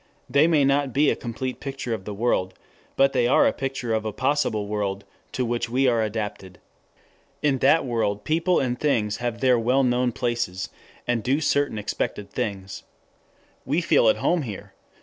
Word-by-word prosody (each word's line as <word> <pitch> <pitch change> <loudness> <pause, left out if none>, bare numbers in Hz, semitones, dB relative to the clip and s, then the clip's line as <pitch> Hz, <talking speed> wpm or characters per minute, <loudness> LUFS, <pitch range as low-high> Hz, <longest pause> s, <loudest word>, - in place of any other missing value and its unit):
They 145 +3 +4
may 155 -4 +3
not 140 -1 +1
be 145 +1 +4
a - - 0
complete 125 +2 -5
picture 135 -4 -4
of 95 -4 -5
the 105 - -5
world, 95 -4 0 0.4
but 135 0 +3
they 125 -2 +2
are 125 - +4
a - - +3
picture 135 -4 -3
of 110 -1 0
a 110 - -3
possible 130 -3 0
world 100 -1 -3 0.3
to 130 - -1
which 120 0 -2
we 130 +3 +2
are 120 -2 +2
adapted. 105 -4 -4 0.9
In 140 -3 +2
that 140 +4 +4
world 110 -4 -1
people 165 +3 +1
and 125 -1 -1
things 110 -8 +1
have 120 -1 -4
their 125 -2 +4
well 125 +4 +2
known 125 0 +1
places, 115 -6 -2 0.4
and 120 -1 +1
do 135 +7 +1
certain 145 -6 +1
expected 105 -1 -3
things. 95 -2 -4 0.8
We 145 +6 0
feel 155 -9 +4
at - - +2
home 175 -1 +1
there. 110 -8 -7
120 Hz, 180 wpm, -24 LUFS, 110-135 Hz, 0.9 s, They